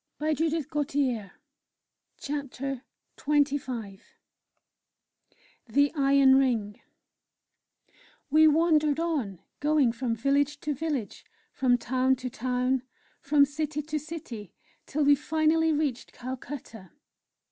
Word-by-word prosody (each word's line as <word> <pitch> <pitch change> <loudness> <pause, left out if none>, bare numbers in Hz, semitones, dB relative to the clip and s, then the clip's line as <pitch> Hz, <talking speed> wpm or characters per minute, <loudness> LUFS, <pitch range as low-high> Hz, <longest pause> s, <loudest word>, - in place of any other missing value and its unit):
CHAPTER 295 - -1 0.9
XXV 275 -4 -3 1.7
THE 285 +5 +3
IRON 275 -2 +5
RING 225 -6 0 1.5
We 315 +1 +7
wandered 310 -1 +3
on, 270 - -2 0.2
going 295 -4 +3
from 235 0 -2
village 280 +4 +1
to 300 - -1
village, 285 -6 -4 0.3
from 250 -3 +2
town 255 +2 +1
to 255 -1 -6
town, 255 +1 0 0.4
from 285 0 +4
city 300 +1 -3
to 305 +1 -3
city, 260 - -8 0.3
till 300 +1 0
we 285 0 +6
finally 315 +2 +2
reached 290 -5 -2
Calcutta. 250 -5 -8
280 Hz, 90 wpm, -27 LUFS, 250-300 Hz, 1.7 s, We